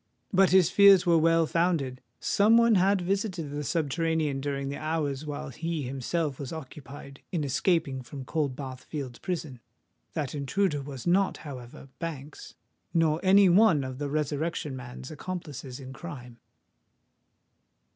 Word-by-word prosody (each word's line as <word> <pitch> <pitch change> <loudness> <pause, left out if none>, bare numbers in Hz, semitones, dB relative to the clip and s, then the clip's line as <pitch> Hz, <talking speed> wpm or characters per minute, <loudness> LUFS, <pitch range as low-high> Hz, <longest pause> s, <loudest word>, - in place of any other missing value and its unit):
But 195 0 +5
his 185 -3 +5
fears 200 -2 +7
were 170 -2 +5
well 165 0 +4
founded: 160 -7 0 0.2
some 215 +3 +4
one 235 -1 +5
had 195 0 +3
visited 185 -4 -2
the 145 0 -3
subterranean 160 -2 0
during 140 -1 -2
the 140 - -4
hours 155 -2 -2
while 145 -2 -5
he 160 +3 -3
himself 135 +3 -2
was 140 -3 -5
occupied 140 -2 -9
in 170 -5 -1
escaping 140 -1 +1
from 130 +2 -9
Coldbath 135 -3 -3
Fields' 135 -6 -6
Prison. 160 -8 -4 0.5
That 145 -4 -3
intruder 150 +2 0
was 135 -3 -8
not, 190 +3 +2
however, 130 -2 -9
Banks—nor 155 - -3
any 195 +1 +6
one 180 -5 +5
of 130 0 -6
the 145 -1 -2
Resurrection 150 0 -2
Man's 125 +1 -8
accomplices 150 -6 -6
in 130 -1 -9
crime. 125 -7 -9
150 Hz, 135 wpm, -28 LUFS, 135-170 Hz, 0.5 s, fears